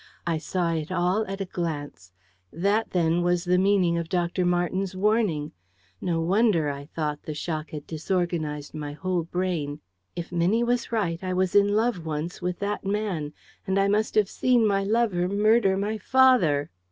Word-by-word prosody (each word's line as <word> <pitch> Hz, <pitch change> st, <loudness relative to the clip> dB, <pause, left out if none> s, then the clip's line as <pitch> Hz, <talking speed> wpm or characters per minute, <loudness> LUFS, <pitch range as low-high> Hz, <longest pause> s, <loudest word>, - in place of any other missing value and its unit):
I 165 Hz, -2 st, 0 dB
saw 170 Hz, +1 st, -1 dB
it 160 Hz, 0 st, -3 dB
all 185 Hz, +4 st, +1 dB
at 195 Hz, +1 st, -5 dB
a -, -, -1 dB
glance. 150 Hz, -, -5 dB, 0.4 s
That, 200 Hz, +7 st, 0 dB
then, 170 Hz, -1 st, +1 dB
was 175 Hz, 0 st, +1 dB
the 180 Hz, +1 st, +3 dB
meaning 185 Hz, -3 st, +3 dB
of 165 Hz, -1 st, -5 dB
Dr. 175 Hz, 0 st, 0 dB
Marten's 180 Hz, +2 st, 0 dB
warning! 195 Hz, -7 st, +1 dB, 0.5 s
No 170 Hz, -2 st, 0 dB
wonder, 185 Hz, -3 st, +2 dB
I 140 Hz, 0 st, -7 dB
thought, 150 Hz, -2 st, -3 dB
the 155 Hz, -, -6 dB
shock 155 Hz, 0 st, -4 dB
had 150 Hz, -2 st, -7 dB
disorganised 160 Hz, -3 st, -2 dB
my 150 Hz, -2 st, -5 dB
whole 185 Hz, +2 st, -1 dB
brain. 165 Hz, -4 st, -2 dB, 0.4 s
If 170 Hz, 0 st, -6 dB
Minnie 180 Hz, +7 st, +2 dB
was 240 Hz, 0 st, 0 dB
right, 180 Hz, -6 st, -1 dB
I 185 Hz, 0 st, -2 dB
was 185 Hz, 0 st, 0 dB
in 205 Hz, 0 st, +4 dB
love 220 Hz, -5 st, +1 dB
once 160 Hz, +3 st, -4 dB
with 180 Hz, 0 st, -2 dB
that 205 Hz, +1 st, -2 dB
man. 195 Hz, -7 st, -2 dB, 0.3 s
And 190 Hz, +1 st, +1 dB
I 195 Hz, -, +3 dB
must 210 Hz, +2 st, +1 dB
have 210 Hz, -2 st, +4 dB
seen 245 Hz, +2 st, +2 dB
my 195 Hz, -2 st, +2 dB
lover 200 Hz, -4 st, +1 dB
murder 205 Hz, -1 st, +3 dB
my 210 Hz, +2 st, -2 dB
father! 230 Hz, -, +3 dB
180 Hz, 175 wpm, -26 LUFS, 165-200 Hz, 0.5 s, in